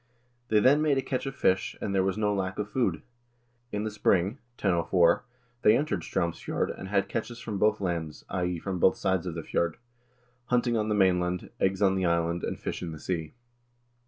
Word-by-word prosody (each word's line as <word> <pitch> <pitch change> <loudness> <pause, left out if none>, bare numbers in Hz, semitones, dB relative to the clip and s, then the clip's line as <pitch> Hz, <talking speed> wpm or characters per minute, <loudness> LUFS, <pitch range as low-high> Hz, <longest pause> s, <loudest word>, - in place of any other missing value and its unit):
They 110 -3 +4
then 140 +7 +5
made 150 -3 +3
a - - +2
catch 130 +1 -2
of 135 - -5
fish, 95 -6 +1
and 100 - -3
there 95 - +3
was 95 +1 0
no 105 -1 +1
lack 95 -1 -2
of 105 0 -3
food. 95 -11 0 0.7
In 105 0 -2
the 110 - -2
spring 100 +3 +1 0.2
(1004) 85 +3 +3 0.4
they 105 +2 +6
entered 120 - -1
Straumsfjord, 85 +1 -2
and 95 - -8
had 100 0 +1
catches 115 +3 -4
from 110 -4 -4
both 105 +1 +3
lands 85 -5 -3
(i.e. 90 -1 -1
from 95 +2 -4
both 95 - +5
sides 95 -1 0
of 85 - -4
the 85 - -4
fjord), 85 +1 -1 0.7
hunting 120 -1 +1
on 110 -1 0
the 105 - +2
mainland, 90 -2 +1
eggs 95 +1 +1
on 95 -1 +4
the 95 -1 0
island, 85 0 +1
and - - -3
fish - - -4
in 85 -2 -4
the 80 - -8
sea." 80 0 -3
95 Hz, 200 wpm, -28 LUFS, 90-105 Hz, 0.7 s, they